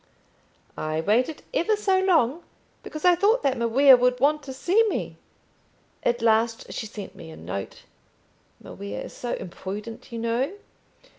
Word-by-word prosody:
"I 155 0 -2
waited 240 - +1
ever 430 +6 +2
so 390 -2 +2
long, 335 -6 +2 0.4
because 310 +2 -7
I 360 - +7
thought 415 +8 +2
that 270 -2 +2
Maria 260 +4 +6
would 250 0 +2
want 300 +2 +3
to 270 -1 -8
see 360 +12 +2
me. - - -4 0.8
At 240 -1 0
last 225 0 +1
she 220 - -4
sent 205 -2 -8
me 165 - -11
a 160 - -11
note. 90 +4 -6 0.8
Maria 100 +1 -7
is - - -9
so 245 - -4
imprudent, 205 +7 -7
you 235 - -5
know. 235 +7 -1
245 Hz, 150 wpm, -25 LUFS, 220-310 Hz, 0.8 s, I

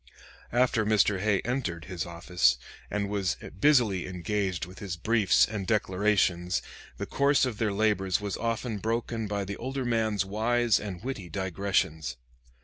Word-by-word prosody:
After 120 -2 +3
Mr. 105 -2 +3
Hay 100 0 +2
entered 115 -10 -3
his 90 -3 -4
office, 85 -6 +2 0.3
and 105 -1 -1
was 100 -3 0 0.2
busily 120 -11 +3
engaged 95 -1 -2
with 90 +1 -12
his 95 -3 -5
briefs 105 +1 +4
and 105 -4 -4
declarations, 95 -4 +1 0.3
the - - -3
course 140 0 +3
of 120 -5 -4
their 110 -2 +1
labors 100 -3 +1
was 100 -2 -3
often 115 -1 -2
broken 115 0 -2
by 100 -1 -2
the 100 +1 -5
older 130 +1 -3
man's 110 -4 +1
wise 115 +3 +2
and 100 -3 -6
witty 120 -9 -5
digressions. 95 -7 -1
105 Hz, 145 wpm, -28 LUFS, 95-115 Hz, 0.3 s, briefs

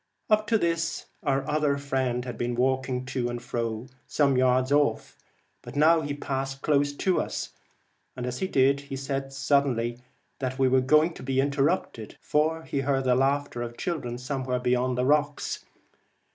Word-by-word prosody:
Up 215 0 +4
to 225 - +3
this 165 -3 -1 0.2
my 140 -4 +1
other 150 -1 +1
friend 130 -3 -1
had 125 -2 -5
been 120 +1 -2
walking 130 0 0
to 125 -2 -2
and 120 0 -4
fro 115 -1 -3 0.2
some 140 -3 +2
yards 130 +1 +3
off, 145 0 +1 0.5
but - - -10
now 160 +3 +5
he 145 -1 -3
passed 135 -1 -4
close 145 -1 +2
to 185 +5 +1
us, - - -4 0.6
and 125 - -4
as 125 0 -4
he 190 - 0
did 140 -2 +3
so 135 - -3
said 135 0 -3
suddenly 135 -4 +1 0.4
that 130 -1 -3
we 135 -1 +3
were 130 0 +4
going 155 +5 +4
to - - -11
be 135 0 -1
interrupted, 140 - 0
for 160 +2 0
he 140 - -2
heard 135 -1 +1
the 130 -1 +3
laughter 135 -1 +1
of 120 0 -5
children 135 -9 -3
somewhere 130 0 -2
beyond 125 0 +1
the 125 - +1
rocks. 145 +1 0
135 Hz, 175 wpm, -27 LUFS, 125-145 Hz, 0.6 s, now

